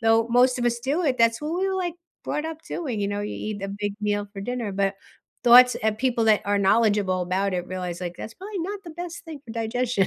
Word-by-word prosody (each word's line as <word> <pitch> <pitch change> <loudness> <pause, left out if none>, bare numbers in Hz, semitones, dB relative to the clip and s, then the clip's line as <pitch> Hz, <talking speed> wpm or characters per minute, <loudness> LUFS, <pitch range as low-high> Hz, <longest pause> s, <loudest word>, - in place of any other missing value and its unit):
though 225 0 +4
most 250 +2 +4
of 240 - -1
us 235 0 +1
do 285 +8 -1
it, 255 -4 +1
that's 230 +1 +3
what 310 +3 -2
we 385 - +1
were, 380 - -1
like, 355 -3 -2 0.3
brought 300 +1 -2
up 320 0 -7
doing, 265 -11 -3
you 200 - 0
know, 205 0 -2
you 205 - -4
eat 210 -2 -4
a 195 - -3
big 205 0 -3
meal 205 -1 0
for 195 - -7
dinner, 240 -1 -3
but 195 0 0 0.5
thoughts 250 +1 +8
of 215 -1 +1
people 240 -3 +1
that 215 -2 +5
are 205 0 +2
knowledgeable 200 -2 +3
about 190 +2 0
it 180 -1 -2
realize 180 -1 -4
like 175 -1 -4
that's 225 - -7
probably 395 - -7
not 395 +3 -4
the 345 - -10
best 345 +1 -7
thing 310 -3 -7
for 230 - -10
digestion, 230 -3 0
230 Hz, 250 wpm, -25 LUFS, 200-265 Hz, 0.5 s, thoughts